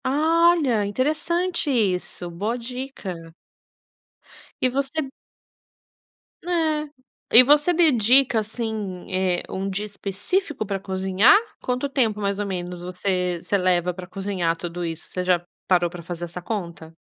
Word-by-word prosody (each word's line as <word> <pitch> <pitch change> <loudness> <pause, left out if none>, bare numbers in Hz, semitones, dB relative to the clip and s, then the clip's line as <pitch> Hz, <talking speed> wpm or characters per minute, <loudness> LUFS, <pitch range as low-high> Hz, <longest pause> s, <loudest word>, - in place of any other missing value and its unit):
Ah, 320 +5 +4
olha, 250 -10 +1
interessante 310 - 0
isso, 190 -7 0
boa 210 +8 -2
dica. 250 -4 -6 1.5
E 255 - +3
você 275 +4 -1 1.4
É. 315 -4 0 0.5
E 250 - +12
você 295 +5 +4
dedica, 265 -7 +4
assim, 215 -4 -4
eh, 185 -1 0
um 195 +1 -3
dia 200 +2 -3
específico 215 - -2
pra 195 -1 -3
cozinhar? 190 - +4 0.2
Quanto 250 +2 -1
tempo 235 -7 0
mais 200 -1 -1
ou 205 - -1
menos 180 -2 -4
você 180 0 -1
você 200 - 0
leva 180 -1 +1
pra 180 0 -9
cozinhar 185 -3 -1
tudo 175 +1 -5
isso? 165 -1 -5
Você 180 - -2
já 180 -1 +2 0.3
parou 175 -2 +3
pra 175 0 -9
fazer 175 0 -5
essa 175 +1 -8
conta? 170 -5 -5
205 Hz, 135 wpm, -23 LUFS, 180-270 Hz, 1.5 s, E